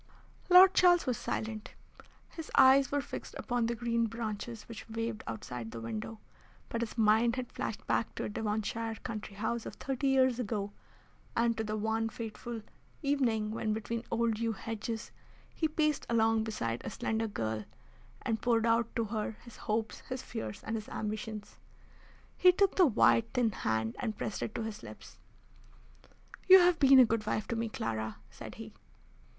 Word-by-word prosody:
Lord 370 +1 +9
Charles 355 -3 +5
was 250 -3 0
silent. 220 -1 -4 0.5
His 325 -2 -8
eyes 270 0 +7
were 285 0 +1
fixed - - -8
upon 245 -2 0
the 235 - -1
green 235 0 0
branches 225 0 -5
which 230 0 -10
waved 225 0 -3
outside 115 +1 -5
the 115 - -7
window; 115 - -5 0.5
but 230 - -2
his 235 0 -4
mind 225 +2 +4
had 255 -2 -5
flashed 215 - -4
back 225 - 0
to - - -3
a - - -3
Devonshire 220 +1 -2
country 215 -4 -6
house 220 +3 -2
of - - -7
thirty 270 0 -2
years 260 -2 +3
ago, 205 -3 -2 0.6
and 230 0 +2
to 220 - -2
the 215 0 -3
one 220 +1 0
fateful 225 0 -6 0.4
evening 240 -7 +1
when, 220 -1 -1
between 225 +1 -3
old 230 -1 0
yew 230 -1 0
hedges, 225 +2 -5 0.4
he 315 - 0
paced 305 -1 0
along 225 -1 +3
beside 120 - -3
a - - -4
slender 225 0 -1
girl, 110 - -3 0.6
and 225 -3 -1
poured 230 -2 +2
out 230 0 +2
to 230 - +1
her 215 0 -3
his 235 -2 -13
hopes, 220 +1 -2
his 255 0 -4
fears, 110 -1 -6
and 225 - -3
his 215 - -7
ambitious. 215 0 -5 0.8
He 365 - +7
took 390 +1 +2
the 365 -3 +6
white, 120 - +4
thin 240 -3 +3
hand 110 - -1
and 220 -3 -3
pressed 210 - -4
it - - -4
to 230 - -2
his 220 -1 -6
lips. - - -12 1.3
"You, 380 0 +11
have 350 -1 +4
been 270 -1 +7
a 255 - +9
good 220 -1 -1
wife 215 0 -1
to 235 - -1
me, 230 0 -1
Clara," 110 - -3
said - - -9
he. - - -9
225 Hz, 175 wpm, -31 LUFS, 215-240 Hz, 1.3 s, You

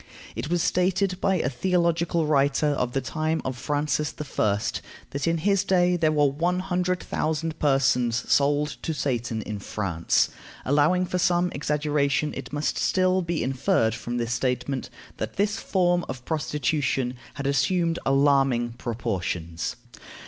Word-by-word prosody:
It 150 - -4
was 175 0 +1
stated 185 +1 +1
by 190 - +2
a 160 - 0
theological 170 +2 +1
writer 145 0 +2
of 125 -4 -1
the 135 - 0
time 155 +5 -1
of 130 - -2
Francis 145 +3 -1 0.3
I., 105 -2 +3 0.5
that 140 +3 -2
in 165 0 +2
his 195 +3 +2
day 180 -2 +3
there 160 -3 +2
were 150 -1 +3
one 165 +6 +1
hundred 180 -1 -1
thousand 160 +1 -2
persons 135 -4 +2
sold 145 +1 +3
to 160 - -3
Satan 120 -6 -2
in 105 -1 -5
France. 95 -5 0 0.4
Allowing 150 +7 +3
for 180 0 -2
some 175 0 +2
exaggeration, 150 0 0
it - - -7
must 145 +1 -1
still 185 0 +2
be 170 -5 -2
inferred 130 - +1
from 120 +1 -4
this 120 0 -1
statement 125 +1 -2 0.3
that 110 - -4
this 205 +2 0
form 175 -2 +1
of 130 -1 -6
prostitution 150 -4 -1 0.2
had 140 - -5
assumed 165 +5 +1
alarming 135 -3 +3
proportions. 90 -8 -3
150 Hz, 145 wpm, -25 LUFS, 130-175 Hz, 0.5 s, I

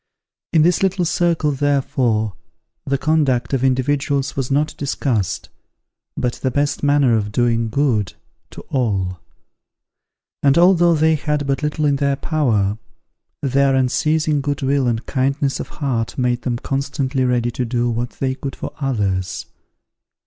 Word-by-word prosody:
In 160 -3 +4
this 175 0 +3
little 190 -2 +1
circle, 165 -2 +1
therefore, 130 -6 0 0.5
the 140 0 +1
conduct 145 -4 +1
of 130 -1 +1
individuals 135 +1 0
was 135 -2 -2
not 150 +2 0
discussed, 130 - -2 0.7
but 120 -1 0
the 130 - +1
best 145 +3 -1
manner 145 -4 +3
of 105 -1 -1
doing 115 0 +1
good 110 -6 0 0.4
to - - -10
all; 95 -9 -1 1.2
and 140 +1 +4
although 175 -1 +5
they 160 +1 +3
had 150 -1 -1
but 135 +1 -1
little 150 0 -1
in 140 -1 +2
their 140 0 +1
power, 110 -10 0 0.6
their 135 0 +2
unceasing 150 +3 +1
good 145 0 -2
will 135 -1 +1
and 115 -1 -1
kindness 135 +1 0
of - - -4
heart 125 -6 -3
made 125 -1 0
them 120 -2 -2
constantly 135 0 -2
ready 120 -1 +1
to 125 - -2
do 120 0 0
what 120 +1 -2
they 130 -1 0
could 135 0 -6
for - - -6
others. 100 -9 -1
135 Hz, 145 wpm, -20 LUFS, 120-145 Hz, 1.2 s, although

